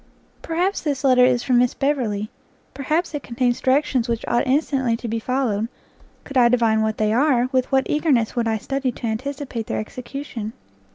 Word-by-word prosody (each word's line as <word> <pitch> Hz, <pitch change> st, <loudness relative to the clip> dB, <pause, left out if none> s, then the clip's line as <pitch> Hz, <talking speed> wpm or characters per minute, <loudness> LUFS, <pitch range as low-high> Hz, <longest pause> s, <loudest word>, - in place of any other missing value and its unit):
Perhaps 360 Hz, +4 st, -1 dB
this 285 Hz, -3 st, -2 dB
letter 255 Hz, -2 st, +5 dB
is 250 Hz, -1 st, +2 dB
from 250 Hz, -3 st, +3 dB
Miss 245 Hz, 0 st, +2 dB
Beverley, 235 Hz, -8 st, -1 dB, 0.4 s
perhaps 315 Hz, +5 st, -1 dB
it 295 Hz, -, -3 dB
contains 245 Hz, +1 st, -1 dB
directions 260 Hz, -2 st, +1 dB
which 230 Hz, -1 st, -2 dB
ought 240 Hz, +3 st, +1 dB
instantly 265 Hz, -4 st, +1 dB
to 235 Hz, -, -6 dB
be 225 Hz, 0 st, -2 dB
followed; 230 Hz, -3 st, -1 dB, 0.6 s
could 275 Hz, -, -4 dB
I 240 Hz, -1 st, +6 dB
divine 230 Hz, -3 st, +3 dB
what 220 Hz, 0 st, -1 dB
they 215 Hz, 0 st, +1 dB
are, 255 Hz, -1 st, +3 dB
with 255 Hz, 0 st, 0 dB
what 265 Hz, -1 st, +3 dB
eagerness 280 Hz, -8 st, +1 dB
would 235 Hz, -2 st, 0 dB
I 220 Hz, -1 st, +1 dB
study 270 Hz, +4 st, -2 dB
to 240 Hz, -, -7 dB
anticipate 250 Hz, 0 st, -4 dB
their -, -, -2 dB
execution! 235 Hz, -1 st, -6 dB
250 Hz, 180 wpm, -22 LUFS, 230-275 Hz, 0.6 s, I